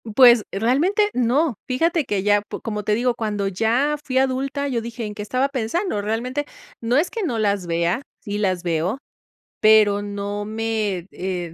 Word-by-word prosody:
Pues, 240 Hz, -4 st, +7 dB
realmente 300 Hz, -, +2 dB
no. 250 Hz, +2 st, +1 dB
Fíjate 325 Hz, +3 st, +1 dB
que 200 Hz, -2 st, -1 dB
ya, 205 Hz, 0 st, +3 dB
pu 205 Hz, -, -8 dB
como 210 Hz, -2 st, -4 dB
te 210 Hz, +1 st, +1 dB
digo, 245 Hz, +2 st, +1 dB
cuando 210 Hz, -3 st, -2 dB
ya 235 Hz, +10 st, +1 dB
fui 260 Hz, -3 st, -2 dB
adulta, 270 Hz, +2 st, 0 dB
yo 245 Hz, -4 st, -1 dB
dije: 230 Hz, 0 st, -6 dB
"¿En 210 Hz, -, -5 dB
qué 210 Hz, -, -7 dB
estaba 255 Hz, +6 st, 0 dB
pensando?", 260 Hz, -, -1 dB
realmente. 245 Hz, +7 st, -2 dB, 0.4 s
No 235 Hz, +3 st, +1 dB
es 325 Hz, +4 st, +1 dB
que 455 Hz, -, -4 dB
no 255 Hz, -, -1 dB
las 200 Hz, -4 st, 0 dB
vea, 170 Hz, +8 st, 0 dB, 0.2 s
sí 205 Hz, 0 st, -4 dB
las 185 Hz, -3 st, 0 dB
veo, 170 Hz, +6 st, -1 dB, 0.6 s
pero 215 Hz, -2 st, +5 dB
no 205 Hz, 0 st, -4 dB
me, 215 Hz, -4 st, -2 dB
eh, 180 Hz, -3 st, -4 dB
225 Hz, 175 wpm, -22 LUFS, 205-260 Hz, 0.6 s, Pues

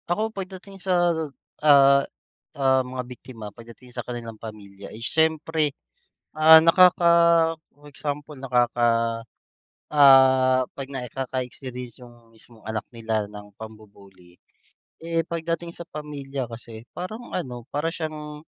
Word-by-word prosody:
Ako 215 Hz, +5 st, -1 dB
pagdating 195 Hz, 0 st, -8 dB
sa, 175 Hz, -2 st, +2 dB, 0.5 s
ah, 140 Hz, -2 st, +6 dB, 0.6 s
ah, 130 Hz, -1 st, +3 dB
mga 125 Hz, 0 st, -5 dB
biktima 125 Hz, -2 st, -11 dB
pagdating 120 Hz, +2 st, -15 dB
sa -, -, -4 dB
kanilang 115 Hz, -3 st, -7 dB
pamilya, 100 Hz, -3 st, -10 dB
is 115 Hz, +2 st, -8 dB
siyempre, 160 Hz, -1 st, +1 dB, 0.6 s
ah, 160 Hz, +1 st, +8 dB
nakaka 175 Hz, 0 st, +5 dB, 0.7 s
for 145 Hz, 0 st, -16 dB
example 145 Hz, +1 st, -5 dB
nakaka 120 Hz, -3 st, +1 dB, 0.7 s
ah, 130 Hz, -2 st, +6 dB
'pag 135 Hz, -1 st, -6 dB
nakaka-experience 125 Hz, -1 st, -6 dB
yung 120 Hz, -1 st, -16 dB
mismong 110 Hz, 0 st, -18 dB
anak 110 Hz, -1 st, -3 dB
nila 110 Hz, -2 st, -2 dB
ng 105 Hz, -1 st, -12 dB
pambu-bully. 100 Hz, -5 st, -14 dB, 0.6 s
Eh, 165 Hz, 0 st, -1 dB
pagdating 170 Hz, 0 st, -3 dB
sa 170 Hz, -, -8 dB
pamilya 140 Hz, -3 st, -6 dB
kasi 115 Hz, -1 st, -10 dB
parang 215 Hz, +7 st, -7 dB
ano, 125 Hz, -8 st, -5 dB
para 150 Hz, +3 st, -1 dB
siyang, 150 Hz, -2 st, -6 dB
130 Hz, 115 wpm, -24 LUFS, 115-155 Hz, 0.7 s, ah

